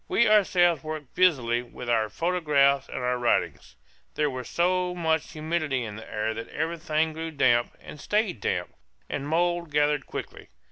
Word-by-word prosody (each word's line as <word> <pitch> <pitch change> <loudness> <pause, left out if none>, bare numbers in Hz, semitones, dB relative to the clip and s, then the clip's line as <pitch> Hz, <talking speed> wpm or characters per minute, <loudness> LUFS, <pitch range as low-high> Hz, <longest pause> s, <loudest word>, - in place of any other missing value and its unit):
We 235 - +3
ourselves 180 -7 +4
worked 155 -3 -7
busily 125 -10 +3
with 125 0 -10
our 110 -2 +1
photographs 145 - +2
and - - -6
our 125 0 -1
writing. 120 - +1 0.6
There 150 -1 +1
was 130 -1 -6
so 180 +1 +1
much 160 -2 -1
humidity 155 -4 -1
in 105 -2 -6
the 110 - -11
air 110 +1 -1
that 115 +1 -7
everything 160 0 -1
grew 165 +1 -5
damp 120 -6 +2
and 150 - -11
stayed 210 - 0
damp, - - -2 0.4
and 140 - -3
mould 175 +1 0
gathered 150 -1 +1
quickly. - - -7
155 Hz, 160 wpm, -26 LUFS, 125-170 Hz, 0.6 s, ourselves